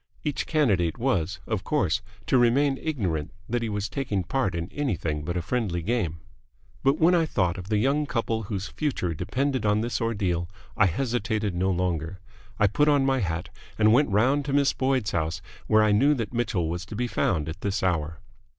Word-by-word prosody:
Each 150 -2 -2
candidate 100 - +2
was, 100 -7 0
of 110 -4 -2
course, 95 - +1 0.2
to 130 - +3
remain 135 +3 +3
ignorant 95 - -2 0.2
that 120 +1 -1
he 115 - -2
was 105 0 -2
taking 110 -6 -2
part 95 -1 -1
in 85 0 -3
anything 85 - -2
but 85 +3 -3
a 85 - -2
friendly 95 -5 -1
game. 90 -7 -1 0.6
But 135 +2 +3
when 170 +3 +4
I 165 -2 +3
thought 90 - 0
of 90 +2 -9
the 105 - +2
young 140 +6 +1
couple 115 -3 -1
whose 100 -2 -4
future 130 - -2
depended 130 - -1
on 105 0 +2
this 115 -2 -2
ordeal, 95 -7 -1 0.3
I 105 - +4
hesitated 110 0 -1
no 90 +2 0
longer. 90 -1 -1 0.4
I 105 - +4
put 145 +9 +2
on 145 -2 +4
my 135 -1 +2
hat 85 -4 -2 0.3
and 110 0 +5
went 140 +2 +4
round 130 +8 +3
to 140 - -2
Miss 140 -1 +3
Boyd's 130 -4 0
house, 80 -1 -1 0.3
where 110 0 +5
I 105 - +3
knew 140 +8 +4
that 115 -2 -4
Mitchell 110 -8 0
was 85 +2 -3
to 110 - -7
be 125 +3 -1
found 85 -9 0
at 80 +5 -6
this 100 0 -1
hour. 80 -4 -1
105 Hz, 195 wpm, -26 LUFS, 90-130 Hz, 0.6 s, and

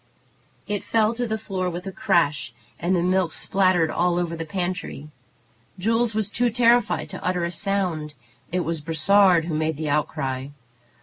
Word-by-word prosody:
It 205 -1 -3
fell 220 0 +2
to 245 +1 -2
the 220 0 -1
floor 190 -4 -3
with 175 +1 -6
a 195 - -4
crash, 145 -9 +1 0.2
and 180 +2 +1
the 170 - +1
milk 185 -2 +1
spattered 185 -4 +2
all 175 0 +1
over 170 -1 -1
the 165 -1 -6
pantry. 175 -4 -4 0.7
Jules 225 +3 +1
was 215 -1 -1
too 245 +2 +1
terrified 240 +1 +3
to 190 - -7
utter 180 -1 0
a 170 - -1
sound. 175 -5 -2 0.4
It 180 +1 0
was 165 -2 -2
Brossard 170 +2 +4
who 165 - -3
made 155 0 -1
the 155 -1 -2
outcry. 135 -3 -1
180 Hz, 170 wpm, -24 LUFS, 160-200 Hz, 0.7 s, Brossard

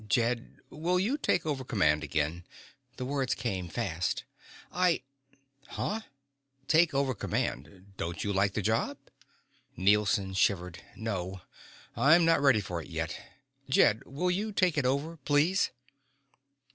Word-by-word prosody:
"Jed, 120 +2 0 0.2
will 175 +4 0
you 220 +9 +1
take 285 - 0
over 140 -4 -2
command 80 - +2
again?" 80 +3 -1 0.5
The 125 - -4
words 135 -3 0
came 95 -6 -3
fast. 90 -5 -2 0.5
"I 180 -5 +2 0.3
" 135 0 -31
"Huh? 220 +2 -1 0.7
Take 160 -2 +4
over 135 -1 +1
command? 95 - -4
Don't 85 +1 -3
you 100 - -1
like 100 0 +2
the 105 - -1
job?" - - 0 0.8
Nielson 100 0 +2
shivered. 90 -2 +1 0.2
"No. 95 -4 -4 0.5
I'm 150 +8 +5
not 165 -3 +4
ready 135 -7 +5
for 90 -3 -4
it - - -11
yet. 80 0 -3 0.5
Jed, 115 -4 +4
will 180 +7 -1
you 210 +4 -1
take 185 -5 +2
it 140 -4 +1
over, 145 +5 -1
please?" 150 +7 +2
120 Hz, 135 wpm, -30 LUFS, 95-150 Hz, 0.8 s, I'm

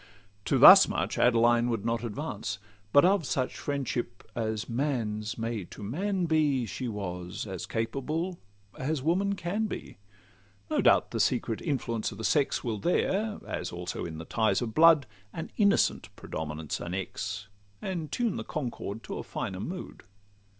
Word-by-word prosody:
To - - +2
thus - - +10
much - - -2
Adeline 120 0 +4
would 115 -3 -2
not 115 0 0
advance; 110 -4 -4 0.3
But 145 +3 +7
of 190 -1 +4
such 130 -2 -1
friendship 130 -4 -3
as 110 -1 -2
man's 115 -4 -2
may 115 -2 -2
to 105 - -11
man 185 - -1
be 150 -6 +2
She 110 +4 -4
was 90 -4 -5
as 95 -4 -6
capable 150 +10 -2 0.4
as 135 0 -1
woman 195 +5 +1
can 200 +5 -1
be. 95 - -7 0.7
No - - +2
doubt - - +4
the - - -2
secret 115 - +1
influence 120 -9 -1
of 105 - -9
the 110 - -6
sex 145 +3 +2
Will 110 -4 -2
there, 205 - 0
as 90 - -4
also 90 0 -5
in 80 -2 -5
the 80 - -7
ties 110 +4 +1
of 115 -3 -3
blood, 160 -2 +6 0.3
An 160 - -6
innocent 200 -2 +3
predominance 75 -1 -5
annex, 95 +2 -4 0.3
And 170 - -4
tune 235 -5 0
the - - -3
concord 120 - -5
to - - -5
a - - -5
finer 95 - -4
mood. 180 - -6
120 Hz, 155 wpm, -29 LUFS, 105-160 Hz, 0.7 s, thus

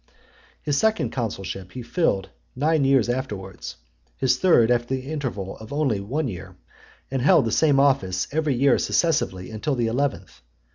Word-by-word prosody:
His 145 -2 0
second 220 0 +1
consulship 95 -6 -5
he 125 - -6
filled 115 - 0 0.3
nine 150 +1 +2
years 135 -4 +3
afterwards; 105 -7 -5 0.4
his 130 -1 +2
third, 125 -11 +4
after 120 +2 +1
the 130 +3 -6
interval 120 -11 -4
of 110 0 -12
only 140 -8 0
one 135 +10 -2
year, 95 -3 -8 0.6
and 135 -2 -1
held 150 +1 +5
the 110 - -1
same 145 0 +3
office 95 -10 +2
every 155 -2 0
year 135 +1 +3
successively 95 - 0
until 125 +7 -2
the 120 -2 0
eleventh. 115 - -2
130 Hz, 155 wpm, -23 LUFS, 100-145 Hz, 0.6 s, held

